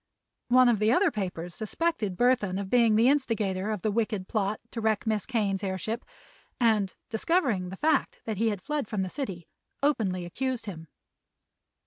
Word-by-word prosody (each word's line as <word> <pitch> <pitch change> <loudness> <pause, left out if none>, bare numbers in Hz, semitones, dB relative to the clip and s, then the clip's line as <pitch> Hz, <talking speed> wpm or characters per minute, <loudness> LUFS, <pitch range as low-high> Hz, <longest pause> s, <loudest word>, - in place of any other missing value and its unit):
One 255 +1 +6
of 235 -4 +3
the 215 +1 +3
other 355 +6 +4
papers 180 -5 -4
suspected 220 - -1
Burthon 235 -6 +2
of 195 -1 -5
being 235 -3 +5
the 225 +3 +5
instigator 220 -8 +1
of 210 -4 -3
the 215 - +1
wicked 210 -3 -1
plot 210 -1 -1
to 230 - -4
wreck 220 -1 +1
Miss 215 -2 0
Kane's 205 -6 0
airship 200 +5 -3 0.6
and, 215 -5 +2 0.2
discovering 225 - +1
the 190 - -7
fact 310 +2 +1
that 220 -3 -3
he 225 +3 +2
had 200 -4 -4
fled 300 -5 -2
from 205 -3 -1
the 185 - -3
city, 190 - -5 0.4
openly 195 -11 +1
accused 255 +7 -3
him. 165 -6 -7
215 Hz, 170 wpm, -28 LUFS, 195-245 Hz, 0.6 s, One